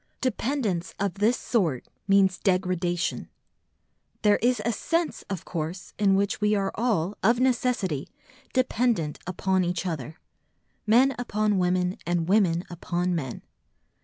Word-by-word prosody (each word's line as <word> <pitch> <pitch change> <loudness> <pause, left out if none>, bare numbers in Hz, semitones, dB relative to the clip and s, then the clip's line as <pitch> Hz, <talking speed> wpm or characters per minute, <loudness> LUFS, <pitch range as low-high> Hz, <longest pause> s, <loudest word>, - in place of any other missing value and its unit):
Dependence 235 -8 -1
of 200 -2 0
this 225 +4 +3
sort 170 - 0 0.2
means 195 -2 +4
degradation. 180 -2 0 0.9
There 210 -1 +5
is 245 0 +1
a 235 - +2
sense, 330 +9 -1
of 190 -4 -4
course, 170 +2 -5
in 195 -2 +4
which 200 +2 0
we 210 0 +3
are 195 -1 0
all, 210 -5 0
of 230 +4 +3
necessity, 240 - 0 0.4
dependent 235 - +1
upon 185 +1 +1
each 175 0 -2
other, 155 -3 -4 0.7
men 255 +5 +5
upon 215 -4 0
women 180 +1 +1
and 175 -1 -1
women 180 -4 +3
upon 175 +1 -2
men. 135 -8 -4
195 Hz, 130 wpm, -26 LUFS, 175-225 Hz, 0.9 s, There